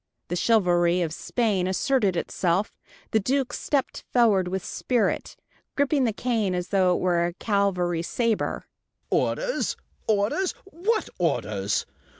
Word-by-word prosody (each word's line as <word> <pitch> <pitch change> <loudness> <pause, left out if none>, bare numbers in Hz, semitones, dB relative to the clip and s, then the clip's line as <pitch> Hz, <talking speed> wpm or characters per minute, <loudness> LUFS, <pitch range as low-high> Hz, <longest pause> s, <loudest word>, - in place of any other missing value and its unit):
The 175 - -1
chivalry 175 -4 +3
of 160 -2 -3
Spain 205 -3 0
asserted 200 +1 +1
itself. 180 +3 0 0.4
The 220 - +3
Duke 265 +5 0
stepped 280 -3 -1
forward 215 -7 +4
with 185 0 -3
spirit, 245 -3 -1 0.4
gripping 285 -1 +2
the 230 - +2
cane 215 -4 0
as 180 0 -3
though 185 -3 +3
it - - -1
were 175 -2 +2
a 175 - -2
cavalry 185 -4 0
saber. 230 +5 -1 0.5
"Orders - - 0 0.3
orders 220 - +1
what 395 +5 -1
orders? - - 0
200 Hz, 130 wpm, -25 LUFS, 180-245 Hz, 0.5 s, forward